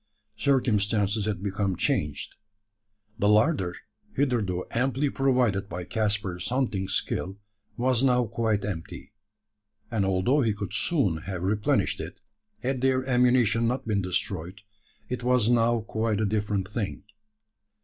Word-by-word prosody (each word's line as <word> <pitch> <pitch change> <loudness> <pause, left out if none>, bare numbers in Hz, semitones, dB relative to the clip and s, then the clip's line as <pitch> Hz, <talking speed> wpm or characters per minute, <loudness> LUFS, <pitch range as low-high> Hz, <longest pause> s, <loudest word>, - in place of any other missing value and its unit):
Circumstances 105 -6 +1
had 100 -3 -2
become 100 -1 -1
changed. 75 -3 -1 0.9
The 105 - +3
larder, 105 - +3 0.4
hitherto 115 -10 0
amply 135 +3 0
provided 125 -7 +1
by 90 +1 -5
Caspar's 100 -3 -1
hunting 120 -7 0
skill, 95 0 -2 0.4
was 125 0 +2
now 125 -2 +3
quite 110 -2 0
empty; 95 0 -6 0.8
and 110 -4 +1
although 95 +9 +2
he 115 -4 +2
could 100 -1 -5
soon 110 - +1
have 90 -2 -4
replenished 105 +2 +1
it - - -7 0.4
had 130 0 -1
their 130 0 +2
ammunition 125 -3 +3
not 125 0 -2
been 105 -2 +1
destroyed, 95 0 -3 0.5
it 125 -1 -3
was 125 -2 +3
now 120 -1 +3
quite 110 -1 -1
a 110 - +2
different 105 -2 -1
thing. 105 -1 -4
110 Hz, 130 wpm, -27 LUFS, 95-125 Hz, 0.9 s, The